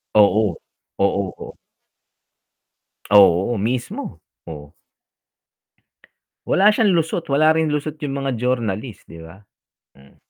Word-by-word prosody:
Oo, 105 -3 +3 0.4
oo, 100 0 0
oh. - - -11 1.5
Oo, 100 +2 +4
mismo, 120 +5 -4 0.2
oh. 75 -3 -11 1.7
Wala 200 +3 +4
siyang 210 -3 +2
lusot, 165 +1 -2
wala 155 +3 +3
rin 160 0 +1
lusot 150 +1 -4
'yon 140 -3 -4
mga 135 -1 -3
journalist, 120 -2 -3
'di 85 - -12
ba? 80 +5 -14 0.5
Hmm. 70 0 -21
120 Hz, 105 wpm, -20 LUFS, 95-150 Hz, 1.7 s, Oo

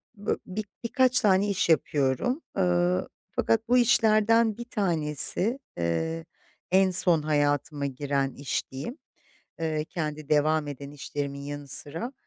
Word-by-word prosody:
b 205 - -14
bö - - +2
bi 210 +4 -5 0.2
birkaç 255 +2 +2
tane 200 -1 +3
iş 185 -3 0
yapıyorum. 155 - +1 0.2
Iıı, 180 -1 +1 0.3
fakat 225 0 +1
bu 250 +2 +4
işlerden 225 -2 +3
1 240 - -7
tanesi, 185 - +3 0.2
eee, 160 - -2 0.5
en 190 0 +4
son 175 -3 +4
hayatıma 145 -1 0
giren 140 0 -2
iş 140 -2 -4
diyeyim, 140 - -6 0.6
eee, 155 -2 -1
kendi 155 -3 -5
devam 155 0 +2
eden 140 0 -8
işlerimin 140 -1 -5
yanı 145 0 -7
sıra, 165 - -4
160 Hz, 130 wpm, -26 LUFS, 145-210 Hz, 0.6 s, bu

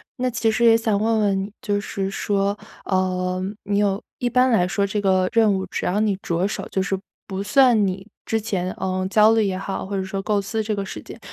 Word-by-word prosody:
那 255 0 -1
其 230 -1 +1
实 220 +2 +2
也 225 -1 +7
想 225 -3 +1
问 220 +1 +2
问 200 -2 +2
你， 195 +2 -4
就 205 -1 0
是 195 -1 -3
说， 200 +1 -1 0.3
呃， 185 -1 0 0.2
你 200 0 -1
有 205 -1 +1 0.2
一 245 - -1
般 250 +2 +3
来 185 -7 +3
说 200 +2 0
这 200 +1 -2
个 190 -2 +2
任 220 -3 +4
务 190 -1 -1
只 - - -4
要 195 +4 +1
你 210 -3 +1
着 175 +3 0
手， 210 - -5
就 190 - 0
是 195 0 -1 0.3
不 195 0 -4
算 235 -1 +4
你 190 0 -3 0.2
之 225 0 0
前， 185 -4 -2
呃， 185 0 -2
焦 215 +1 +6
虑 220 -1 +3
也 190 -2 -1
好， 195 +1 -4
或 200 +1 -4
者 190 - -1
说 190 +1 -4
构 205 0 +1
思 220 +3 -2
这 215 0 -1
个 200 - -2
时 195 - -7
间， - - -11
200 Hz, 255 characters per minute, -22 LUFS, 190-220 Hz, 0.3 s, 也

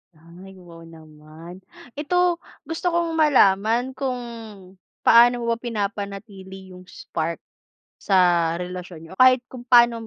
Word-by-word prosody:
Ay 175 +4 -15
wow 170 -1 -14
naman. 160 +2 -14 0.4
Ito 350 +3 0 0.2
gusto 325 +4 -7
kong 340 -1 0
malaman 235 -4 +2
kung 260 -1 -4 0.8
paano 240 +1 +5
mo 235 - -1
ba 230 - -1
pinapanatili 200 -4 -7
yung 180 0 -14
spark 165 -1 -5 0.6
sa 175 -4 +2
relasyon 180 -1 -8
niyo 165 - -14
o - - 0
kahit 255 -1 +6
kung 255 - -10
paano 240 -1 +5
200 Hz, 125 wpm, -22 LUFS, 175-250 Hz, 0.8 s, kahit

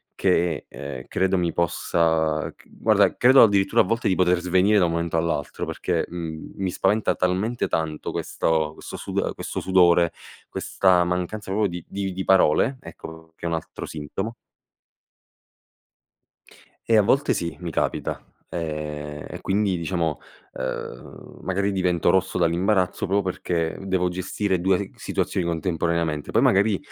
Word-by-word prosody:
che 90 -4 +1
è - - -7
uhm, - - -17
credo 95 0 +1
mi 85 -2 0
possa, 80 -2 +1
ch - - -22
guarda - - +2
credo 130 +2 +7
addirittura, 100 -3 +4
a - - +4
volte, 115 +4 0
di 95 - +2
poter 90 -1 +3
svenire 95 +4 +3
da 90 - +4
un 85 - 0
momento 85 0 -1
all'altro, 80 -4 -2
perché, - - -1
mhmm, 80 -2 -6
mi 95 -1 -1
spaventa 105 +4 +1
talmente 95 +7 0
tanto 80 -2 -2
questo- 80 -1 -1
questo - - -8
sud - - -6
uhm, - - -1
questo - - -5
sudore, 90 -2 +4 0.4
questa 90 -2 +2
mancanza 90 +3 -3
proprio 105 +1 +2
di 90 -1 -6
di 95 -1 -3
di 95 +1 -3
parole, 95 - +4
ecco 80 -6 -11
che - - -9
è 85 - 0
un 85 - 0
altro 80 - -6
sintomo. 80 +9 -5 2.5
Eh 115 - +5
a - - +7
volte 135 +8 +2
sì, 85 0 -3
mi 85 - -4
capita. - - -2 0.3
Ehm, 75 -2 -5
e - - -7
quindi 100 -1 0
diciamo, 85 -2 -1 0.4
uhm, - - -7
magari 100 +2 0
divento 90 -3 +1
rosso 95 0 +2
dall'imbarazzo, 90 +3 +1
proprio 100 +2 +2
perché 85 -3 -2
devo 95 -2 0
gestire 95 +1 -1
2 95 +2 +1
gh - - -26
situazioni 90 - -2
contemporaneamente, 85 -2 -1
poi - - +3
magari 100 +1 +4
90 Hz, 155 wpm, -24 LUFS, 80-95 Hz, 2.5 s, credo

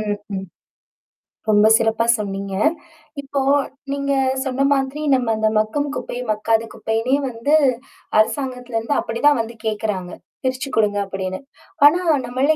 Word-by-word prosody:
ம். 210 -1 -1 0.2
ம். 190 0 -4 1.0
ரொம்ப 210 0 +5
சிறப்பா 225 0 +1
சொன்னீங்க. 195 -2 -4 0.7
இப்போ 275 0 -2 0.5
நீங்க 280 0 -1 0.3
சொன்ன 265 +1 0
மாதிரி, 275 +2 0
நம்ம 255 -3 +1
அந்த 215 0 +1
மக்கும் 250 +7 0
குப்பை, - - -5
மக்காத 220 +1 +1
குப்பைனே 225 +4 0
வந்து 235 +5 -1 0.7
அரசாங்கத்துல 250 0 -1
இருந்து 230 +6 -1
அப்டி 230 +1 -4
தான் 290 -5 +4
வந்து 230 +1 -7
கேட்குறாங்க. 210 -4 -2 0.3
பிரிச்சு 260 +1 -2
கொடுங்க 205 -2 +2
அப்டின்னு. 190 -1 -4 0.5
ஆனா 325 +5 +6 0.2
நம்மள்ல 265 +5 +1
230 Hz, 130 wpm, -20 LUFS, 215-270 Hz, 1.0 s, ஆனா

